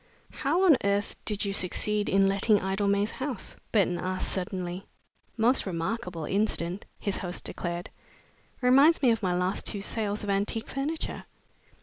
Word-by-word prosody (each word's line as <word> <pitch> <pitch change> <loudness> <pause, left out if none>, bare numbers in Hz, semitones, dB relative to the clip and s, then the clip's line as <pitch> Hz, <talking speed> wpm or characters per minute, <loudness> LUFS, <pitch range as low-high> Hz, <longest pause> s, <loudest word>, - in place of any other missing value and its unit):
"How 335 +7 0
on 315 -7 +6
earth 200 0 0
did 210 -1 0
you 200 - -1
succeed 205 +3 0
in 195 0 +4
letting 200 +2 +3
Idlemay 200 +2 +1
House?" 260 -5 -5 0.2
Burton 190 -5 +2
asked 185 0 -2
suddenly. 185 0 -4 0.5
"Most 235 0 +3
remarkable 180 -1 -3
incident," 195 -1 0
his 200 - -2
host 180 -2 -5
declared. 175 0 -4 0.7
"Reminds 275 +5 +5
me 250 - +6
of 225 - 0
my 180 -3 0
last 180 +2 -1
two 200 - -1
sales 210 0 -2
of 205 - -4
antique 205 +3 -1
furniture. 290 +4 -3
200 Hz, 145 wpm, -28 LUFS, 185-225 Hz, 0.7 s, on